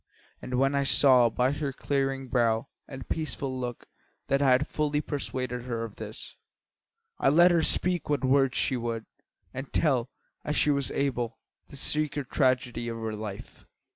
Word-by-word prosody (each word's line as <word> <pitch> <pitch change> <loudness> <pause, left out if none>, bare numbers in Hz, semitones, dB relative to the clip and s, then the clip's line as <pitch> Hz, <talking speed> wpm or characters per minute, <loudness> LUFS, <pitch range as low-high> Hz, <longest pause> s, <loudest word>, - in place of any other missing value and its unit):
And 125 - -4
when 135 +2 +2
I 140 - +2
saw, 130 -3 +5
by 125 +3 +1
her 145 -1 -2
clearing 135 0 -2
brow 120 -1 +1 0.2
and 135 -2 -9
peaceful 135 -4 -3
look, 120 -2 -5 0.4
that 140 +1 +2
I 140 - +4
had 130 +3 +4
fully 150 -1 -1
persuaded 130 -5 -4
her 115 -2 -3
of 115 -3 -8
this, - - -9 0.8
I - - +4
let 175 +5 +6
her 170 -1 +3
speak 175 +1 0
what 145 -2 +1
words 135 0 +3
she 130 - +1
would, 115 -2 -3 0.5
and 135 +1 -6
tell, 130 -6 +1 0.3
as 150 - -2
she 150 - +3
was 140 -2 0
able, 120 -5 -2 0.3
the - - -12
secret 150 -1 +1
tragedy 125 -3 +1
of 115 -1 -4
her 110 -1 -4
life. 105 -2 -8
130 Hz, 170 wpm, -28 LUFS, 120-140 Hz, 0.8 s, let